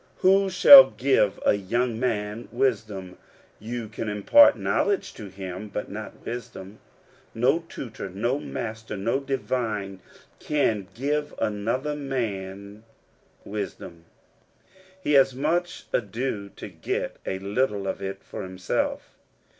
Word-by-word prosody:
Who 195 +1 +4
shall 265 +9 +10
give 125 -6 +1
a^young 115 +4 +1
man 110 -2 -2
wisdom? 100 -7 -2 0.4
You 115 +1 -5
can 110 0 -5
impart 105 - +6
knowledge 405 -2 0
to 105 - -9
him, 95 +1 -7
but 105 - -5
not 110 +1 -8
wisdom. 115 -4 -7 0.6
No 130 +8 +3
tutor, 110 -6 -7
no 120 +9 -1
master, 110 -4 -6
no 115 +7 0
divine, 115 -8 -3 0.4
can 115 -10 0
give 145 +4 -2
another 115 +8 -1
man 100 -7 -4 0.6
wisdom: 85 0 -6 0.9
he 165 - -2
has 135 -2 +5
much 170 +6 -1
ado 105 -1 -2
to - - -8
get - - -4
a 95 - -1
little 100 +1 -1
of 100 - -3
it 95 0 -5
for - - -7
himself. 95 0 -3
110 Hz, 115 wpm, -25 LUFS, 100-135 Hz, 0.9 s, shall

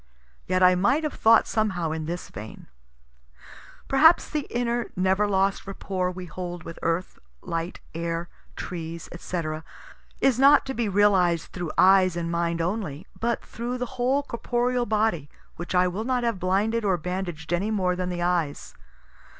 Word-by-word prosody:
Yet 185 0 +2
I 180 0 +7
might 240 - +2
have 305 - -2
thought 225 +1 +5
somehow 190 -7 -1
in 160 -1 -3
this 175 +1 -5
vein: 105 +3 -9 1.2
Perhaps 320 +5 +5
the 300 -2 -2
inner 240 0 -1
never 190 +3 +2
lost 195 0 0
rapport 190 -2 -2
we 180 0 -7
hold 175 0 -6
with 165 - -9
earth, 165 +2 -2 0.2
light, 165 +2 -4
air, 170 +1 -3 0.3
trees, 165 -2 -6
&c., 175 0 -4 0.8
is 260 -3 +3
not 280 +2 +6
to 265 - -3
be 235 -4 -1
realized 185 -4 +3
through 175 -3 -4
eyes 185 -1 +5
and 170 -1 -2
mind 170 0 0
only, 175 -4 -3
but 235 0 -1
through 240 +2 -4
the 250 0 -5
whole 270 +3 +2
corporeal 240 0 -1
body, 210 -9 0 0.3
which 175 +2 -4
I 180 0 +4
will 190 +5 -3
not 250 0 0
have 230 -5 -1
blinded 205 +5 +1
or 190 -3 +2
bandaged 175 -1 -4
any 190 +5 0
more 185 -4 +1
than 180 0 -3
the 175 -1 -2
eyes. 170 -5 -1
185 Hz, 160 wpm, -25 LUFS, 175-230 Hz, 1.2 s, I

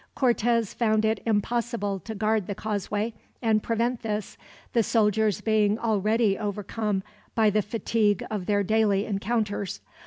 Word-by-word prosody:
Cortez 235 -3 +2
found 220 -2 +2
it 220 -1 +1
impossible 220 -2 0
to 220 +4 -7
guard 215 -1 +1
the 200 - -3
causeway 210 +1 -2 0.3
and 220 -3 +2
prevent 235 +2 -1
this, 210 -3 -3 0.4
the 235 - +4
soldiers 215 -2 +2
being 215 -1 +2
already 215 -1 +1
overcome 210 -1 -2 0.3
by 220 -2 +4
the 215 +1 +2
fatigue 210 -1 0
of 205 -4 -3
their 205 -1 +2
daily 210 -1 +2
encounters. 205 -1 -2
215 Hz, 135 wpm, -26 LUFS, 205-225 Hz, 0.4 s, the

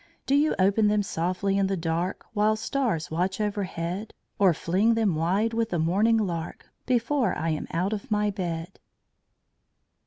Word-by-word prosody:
Do 270 - 0
you 295 +2 +3
open 200 +3 +3
them 210 0 +2
softly 185 +2 -1
in 195 - +2
the 195 0 -1
dark, 170 +2 -2
While 215 0 +3
stars 220 - -1
watch 180 +5 -1
overhead? 200 -1 -3 0.2
Or 195 -3 +6
fling 190 +8 +1
them 220 -5 +2
wide 190 +8 +1
with 230 0 0
the 175 - -1
morning 200 +8 +3
lark, 175 -6 -3 0.2
Before 245 -2 +1
I 165 +2 -1
am 155 -1 -2
out 180 +5 -1
of 205 - -5
my 210 -1 +1
bed? 175 -2 -5
195 Hz, 160 wpm, -26 LUFS, 170-215 Hz, 0.2 s, Or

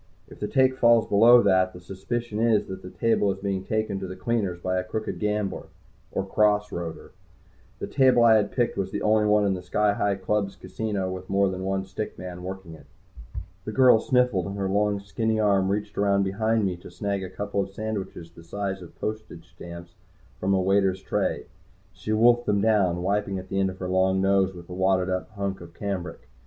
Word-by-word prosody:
If - - -14
the 105 - -2
take 130 +3 +2
falls 115 -1 +5
below 120 +4 +6
that, 95 -1 +3
the 90 - -10
suspicion 105 +5 -4
is 115 -2 +3
that 95 0 -7
the 90 - -9
table 110 -1 +1
is 95 - -5
being 95 -1 -3
taken 110 -1 -2
to 95 - -5
the 95 - -7
cleaners 100 -3 -1
by 90 +1 -1
a - - -2
crooked 110 +4 -4
gambler, 105 -2 -2 0.4
or 95 - -2
"cross 105 +1 +2
roader." 85 -2 -6 0.7
The - - -4
table 130 -3 +4
I 115 -1 +7
had 105 -2 +2
picked 120 -5 0
was 95 -1 -1
the - - -4
only 105 0 +3
one 105 0 +3
in 100 - +2
the 90 - -4
Sky 105 +3 +1
Hi 100 -1 0
Club's 100 +1 -1
casino 100 -4 -3
with 95 0 -7
more 100 0 +2
than 95 0 -5
one 95 0 -1
stick 95 +3 -6
man 90 -1 -7
working 95 -2 -7
it. 80 - -15 0.8
The 110 - -5
girl 125 -1 +6
sniffled, 125 -7 +1
and 100 +1 -5
her 95 -1 -1
long 100 +1 +1
skinny 110 +2 -1
arm 100 -3 +2
reached 105 +1 -2
around 100 -1 +3
behind 110 +3 0
me 90 -2 -2
to 90 - -12
snag 100 +2 -3
a 95 - -6
couple 100 +1 -2
sandwiches 100 -5 -6
the 85 0 -15
size 95 +2 -4
of 85 - -13
postage 110 -6 -6
stamps 85 0 -10 0.5
from 95 +1 +1
a - - +2
waiter's 95 0 +1
tray. - - -1 0.5
She 95 +4 -6
wolfed 120 +2 +4
them 100 -1 +2
down, 95 -5 +2
wiping 100 0 0
at 95 0 -8
the 95 - -1
end 95 0 +2
of 95 - -8
her 90 - -5
long 95 +1 +2
nose 95 -1 +2
with 85 -1 -11
a 90 - -8
wadded 95 0 +1
up 95 0 -2
hunk 100 -2 -4
of 85 -1 -12
cambric. 100 -3 -5
100 Hz, 210 wpm, -25 LUFS, 95-105 Hz, 0.8 s, I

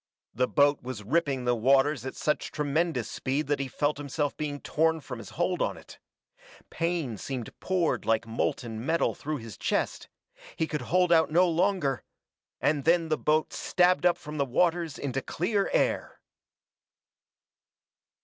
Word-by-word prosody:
The 125 +3 +1
boat 145 +1 +3
was 125 -4 -6
ripping 135 0 0
the 125 - +3
waters 135 +2 +3
at - - -6
such 150 - -1
tremendous 155 +3 0
speed 140 +3 -2
that 145 0 0
he 140 - -2
felt 145 +2 -1
himself 145 0 -2
being 145 -2 -4
torn 160 +2 +1
from 130 -5 -8
his - - -9
hold 175 +1 0
on - - 0
it. - - -14 0.7
Pain 165 -9 -1
seemed 125 0 -5
poured 185 -3 0
like 115 0 +1
molten 115 0 -2
metal 165 +5 +1
through 155 +1 -4
his 115 -5 -10
chest - - -1 0.5
he 160 - 0
could 150 -3 -3
hold 180 0 +3
out 160 -1 +5
no 175 +4 +4
longer; 170 -6 +1 0.6
and 145 -2 +1
then 165 +1 +3
the 155 - +3
boat 155 +1 +1
stabbed 180 0 +3
up 175 - +2
from 150 0 -7
the - - +4
waters 165 +3 +1
into 135 -1 -2
clear 195 +8 -1
air! - - 0
150 Hz, 160 wpm, -28 LUFS, 135-170 Hz, 0.7 s, out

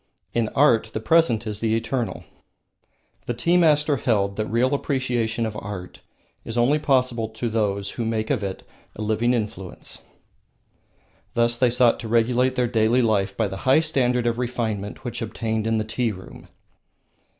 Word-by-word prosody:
In 115 -2 0
art 120 -6 +4
the - - -2
present 120 -2 +2
is 105 -1 -3
the 110 0 +1
eternal. 120 +1 -2 1.0
The 120 - -2
tea 170 +9 +1
masters 150 -6 +3
held 100 -4 +1
that 110 +1 -2
real 125 +5 +1
appreciation 120 -5 -1
of 110 -1 -4
art 95 -3 -7 0.4
is 115 - -6
only 130 +6 +3
possible 125 -6 +1
to 110 +2 -4
those 100 -3 -1
who 120 - -4
make 110 +1 -1
of 130 -6 0
it 95 -2 -5 0.3
a 110 - -5
living 110 +3 +1
influence. 105 -5 -6 1.4
Thus 120 0 +2
they 125 - +4
sought 120 0 +3
to 115 - -6
regulate 120 +3 +2
their 125 -1 +1
daily 115 +2 +2
life 100 -3 0
by 110 - +1
the 95 - -6
high 130 +9 +3
standard 125 -6 +1
of 120 0 0
refinement 115 -3 -3
which 120 -1 -4
obtained 110 0 -2
in 115 0 +1
the 110 - 0
tea 115 +1 -1
room. 95 -2 -11
115 Hz, 165 wpm, -23 LUFS, 110-125 Hz, 1.4 s, art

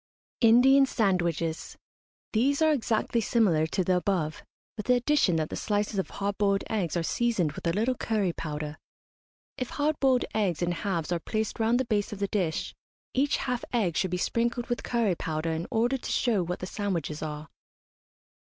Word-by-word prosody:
INDIAN 260 +4 +6
SANDWICHES. 170 - -1 0.6
These 275 +7 +2
are 315 - +5
exactly 235 -3 0
similar 190 -9 +2
to 185 - 0
the 180 +1 +2
above, 175 -5 -1 0.3
with 210 - -6
the 250 - +5
addition 245 - +2
that 155 -1 -1
the - - -3
slices 205 -1 -1
of 190 - -2
hard 200 0 -3
boiled 200 -1 +2
eggs 180 -6 -1
are 170 - 0
seasoned 215 -5 +1
with 160 - -6
a - - +3
little 220 +8 +1
curry 210 -7 -1
powder. 150 -1 -5 0.8
If 255 - -3
hard 295 +1 -1
boiled 260 -2 +3
eggs 185 -6 0
in 175 - +1
halves 175 -2 -2
are 175 - +1
placed 220 +7 -3
round 230 +2 +3
the 260 - 0
base 210 -3 0
of 210 - -5
the 200 0 -1
dish, 180 -6 -1 0.4
each 275 +2 +2
half 250 -2 -2
egg 200 -9 +1
should 185 - +1
be 180 - -1
sprinkled 235 +5 -1
with 240 - -1
curry 230 -5 +1
powder 160 -1 -2
in 160 +1 -3
order 240 +4 +1
to - - -5
show 225 -6 +2
what 180 +1 -4
the - - -3
sandwiches 175 -7 -3
are. 150 0 -5
205 Hz, 185 wpm, -28 LUFS, 170-235 Hz, 0.8 s, INDIAN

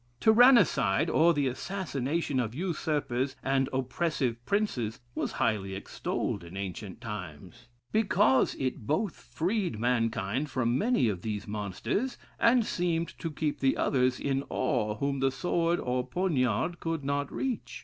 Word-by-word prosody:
Tyrannicide, 220 - +5
or 165 +2 +5
the 145 -4 +1
assassination 145 -1 -2
of 115 -1 -2
usurpers 145 -6 -1
and 135 0 +1
oppressive 130 -2 -1
princes, 130 - 0
was - - -2
highly 95 -3 0
extolled 100 -1 -3
in 85 +3 -9
ancient 100 +1 -5
times; 105 - -8 0.2
because 165 - +3
it 130 -5 -3
both 170 +5 0
freed 180 - -2
mankind 115 +2 0
from 120 -3 0
many 220 - +2
of 95 -5 -2
these 105 0 -4
monsters, 105 - -2 0.2
and 235 -1 +4
seemed 170 -3 0
to 165 - -3
keep 150 -1 -2
the 135 -1 +2
others 130 -1 +2
in 135 -1 0
awe 105 -4 0
whom 140 +4 -1
the 135 0 +3
sword 170 +5 0
or 125 0 -1
poniard 150 - 0
could 165 -3 -2
not 140 0 -1
reach. 260 -4 -3
135 Hz, 140 wpm, -29 LUFS, 115-170 Hz, 0.2 s, Tyrannicide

